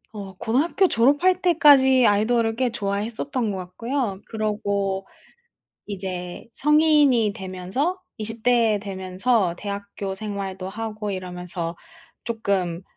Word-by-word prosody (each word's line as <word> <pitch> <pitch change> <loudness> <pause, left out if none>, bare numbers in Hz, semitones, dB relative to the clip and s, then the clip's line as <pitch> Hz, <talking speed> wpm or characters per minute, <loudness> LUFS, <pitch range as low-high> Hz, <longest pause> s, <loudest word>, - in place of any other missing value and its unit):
어 195 -2 -7
고등학교 300 - +2
졸업할 290 +9 +3
때까지 275 -7 +6
아이돌을 225 +2 +2
꽤 255 +1 +1
좋아했었던 220 +4 -2
것 195 - -4
같고요. 205 +3 -3
그러고 200 -3 -2 0.8
이제 185 -3 -6
성인이 295 -7 +4
되면서 190 - -3 0.2
20 225 +1 -6
대 230 -4 +3
되면서 190 0 0
대학교 200 -1 -5
생활도 195 -2 -5
하고 215 0 -5
이러면서 180 -2 -5 0.5
조금 195 -7 -2
210 Hz, 250 characters per minute, -23 LUFS, 190-245 Hz, 0.8 s, 때까지